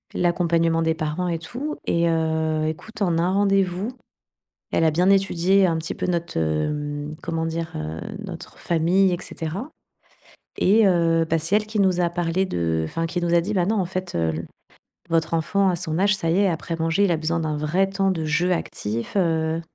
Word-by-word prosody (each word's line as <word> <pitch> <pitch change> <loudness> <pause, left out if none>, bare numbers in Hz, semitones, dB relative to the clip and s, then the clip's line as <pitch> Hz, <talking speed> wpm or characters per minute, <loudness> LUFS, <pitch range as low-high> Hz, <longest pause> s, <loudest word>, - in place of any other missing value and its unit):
l'accompagnement 170 -2 +2
des 160 0 +1
parents 160 +3 -2
et 170 -1 -1
tout, 255 - -5
et 170 0 +2
heu, 160 -1 0
écoute, 210 +8 -7
en 170 -3 +1
un 175 +2 +1
rendez-vous, 195 +1 +1 0.8
elle 165 - +2
a 160 - +4
bien 180 +5 +2
étudié 195 0 +3
un 165 -2 0
petit 160 - -4
peu - - -3
notre, 170 - -2
heu, 145 - -2
comment 165 -1 -2
dire? 165 0 -3
Heu, 80 +1 -5 0.3
notre - - -9
famille, 175 +3 +2
et - - +1
cetera 185 - -5 0.9
et 215 +3 +4
heu, 165 -2 +3
bah 165 - +3
c'est 165 +5 0
elle 215 - +1
qui 215 0 -4
nous 185 -2 +3
a 170 -1 +2
parlé 175 +1 0
de 85 - -1
enfin 165 - -2
qui 175 +2 -3
nous 175 0 0
a 170 - +5
dit: 205 +5 -3
«Bah 180 -3 +2
non, 220 +3 +1
en 185 - +1
fait, 185 +1 -5
heu, 80 -1 +1
le 80 +2 -5 0.6
votre 165 0 +1
enfant 195 +4 +2
à 180 - +1
son 165 -1 -2
âge, 205 +2 +3
ça 165 -3 -1
y 170 - +2
est, 200 -1 +4
après 165 0 -3
manger, 165 +4 +1
il 195 - +2
a 170 - +2
besoin 165 +1 -1
d'un 155 -2 -2
vrai 175 +6 +1
temps 195 0 +1
de 160 -3 -3
jeu 165 +4 +1
actif, 115 -9 -3
heu,». 160 -3 +1
170 Hz, 205 wpm, -23 LUFS, 160-185 Hz, 0.9 s, a